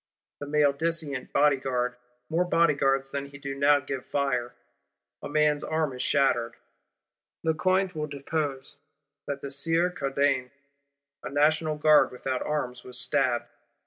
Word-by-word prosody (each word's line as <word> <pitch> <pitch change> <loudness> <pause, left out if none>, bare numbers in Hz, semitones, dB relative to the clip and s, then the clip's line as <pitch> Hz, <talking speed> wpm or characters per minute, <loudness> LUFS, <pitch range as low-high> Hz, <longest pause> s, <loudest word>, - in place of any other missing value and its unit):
The 145 - -6
maledicent 150 -1 0
Bodyguard, 130 -4 +1 0.3
more 165 +5 +1
Bodyguards 140 -6 +2
than 140 0 -3
he 140 0 -12
do 140 0 -5
now 145 +1 +4
give 135 -1 -5
fire; 125 -4 -1 0.7
a - - -6
man's 150 0 +2
arm 155 -3 -1
is 125 - -5
shattered. 120 -5 +1 0.9
Lecointre 185 +4 +1
will 150 -2 -3
depose 145 -1 -4 0.5
that 140 -1 -4
"the 140 - -6
Sieur 165 +5 +1
Cardaine, 135 -4 0 0.7
a - - -6
National 155 +2 +2
Guard 155 0 +5
without 130 0 -3
arms, 125 -5 -3
was 125 -1 -8
stabbed." 125 -3 +1
140 Hz, 130 wpm, -27 LUFS, 135-155 Hz, 0.9 s, Guard